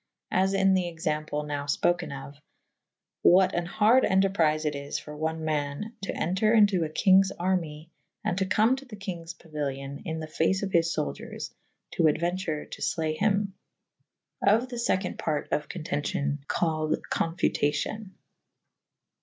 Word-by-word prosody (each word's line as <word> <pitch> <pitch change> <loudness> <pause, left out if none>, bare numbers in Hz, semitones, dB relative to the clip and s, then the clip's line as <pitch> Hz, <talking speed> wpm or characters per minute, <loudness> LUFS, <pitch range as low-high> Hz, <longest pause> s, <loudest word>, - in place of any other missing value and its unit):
As 190 +1 +2
in 195 0 +4
the 185 -2 +1
example 155 -3 -2
nowe 145 -1 -3
ipokew 145 -1 0
of 140 +1 -18 0.4
/ - - -62
what 185 +1 +5
an 175 0 -1
harde 220 +7 +4
enterprife 175 -5 +2
it 150 - +1
is 140 0 -4
for 150 - -8
one 160 +1 -2
man 150 +7 -2
to 195 - -3
entre 200 +6 +2
into 200 -5 +5
a 155 - -2
kynges 190 +3 +5
annye 170 -4 -1 0.2
/ - - -55
and - - +1
to 190 - 0
come 220 +6 +3
to 275 - -10
the 240 -5 -9
kynges 175 -5 -6
pauilio« 140 -3 -5
in 160 -1 -4
the 160 - -4
face 165 +5 0
of 195 - -2
his 165 -1 +3
fouldiers 155 -2 -4 0.4
to 165 - +1
aduenture 165 0 0
to - - -8
flee 160 -1 0
hym. 200 +1 +1 0.9
Of 225 +5 +3
the 245 - -6
feconde 190 -5 -1
part 150 -2 -2
of 150 - -1
contencion 145 -3 -2
/ - - -52
called 155 -2 0 0.2
confutacion. 170 +4 -1
170 Hz, 160 wpm, -27 LUFS, 150-195 Hz, 0.9 s, what